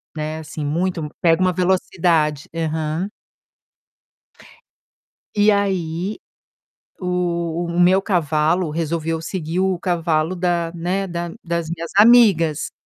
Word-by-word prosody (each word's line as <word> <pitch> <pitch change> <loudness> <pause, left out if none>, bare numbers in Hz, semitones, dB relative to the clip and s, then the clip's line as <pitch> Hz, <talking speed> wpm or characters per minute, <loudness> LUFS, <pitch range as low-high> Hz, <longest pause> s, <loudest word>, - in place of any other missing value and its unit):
né, 155 0 -4
assim 155 -1 -6
muito 165 +1 -1
pega 165 -1 +4
uma 185 0 +2
velocidade. 170 -4 +1
Aham. 160 +2 -2 2.3
E 210 +1 +5
aí, 190 -1 -1 0.8
o 180 -2 -1 0.2
o 170 +1 -2
meu 185 +2 +5
cavalo 165 -2 +1
resolveu 165 0 -2
seguir 165 0 -3
o 190 -1 +1
cavalo 170 -2 0
da 175 -2 0
né, 180 +3 -2
da 170 -1 -4
das 170 -2 -2
minhas 170 0 -5
amigas. 205 -9 +5
170 Hz, 105 wpm, -20 LUFS, 160-185 Hz, 2.3 s, E